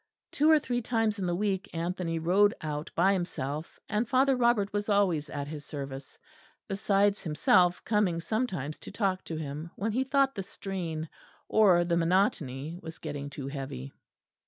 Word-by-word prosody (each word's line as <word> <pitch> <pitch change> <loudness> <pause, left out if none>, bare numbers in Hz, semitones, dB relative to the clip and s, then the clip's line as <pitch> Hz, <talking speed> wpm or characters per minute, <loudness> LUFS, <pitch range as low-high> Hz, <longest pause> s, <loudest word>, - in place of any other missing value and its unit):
Two 300 +2 +3
or 315 - +8
three 245 -4 -1
times 225 -3 0
in 185 - -1
the 175 - 0
week 200 0 -1
Anthony 170 0 -2
rode 190 +6 +3
out 150 -1 -4
by 190 +4 +4
himself; 155 -4 -4
and 215 +2 -1
Father 270 0 +4
Robert 235 -5 +2
was 205 +1 -1
always 180 -8 +2
at 140 -1 -4
his 150 -1 -7
service, 140 -2 -7 0.5
besides 200 0 +2
himself 180 - +3
coming 205 -6 +2
sometimes 175 - -2
to - - -10
talk 195 -3 0
to 165 - -5
him 155 +1 -5
when 215 +3 -1
he 255 +5 +1
thought 275 0 +2
the 200 - -4
strain 180 -5 -5 0.4
or 190 -5 +5
the 170 0 +1
monotony 165 -4 0
was 160 0 -8
getting 145 -2 -5
too 140 -1 -6
heavy. 135 - -6
180 Hz, 165 wpm, -29 LUFS, 155-210 Hz, 0.5 s, or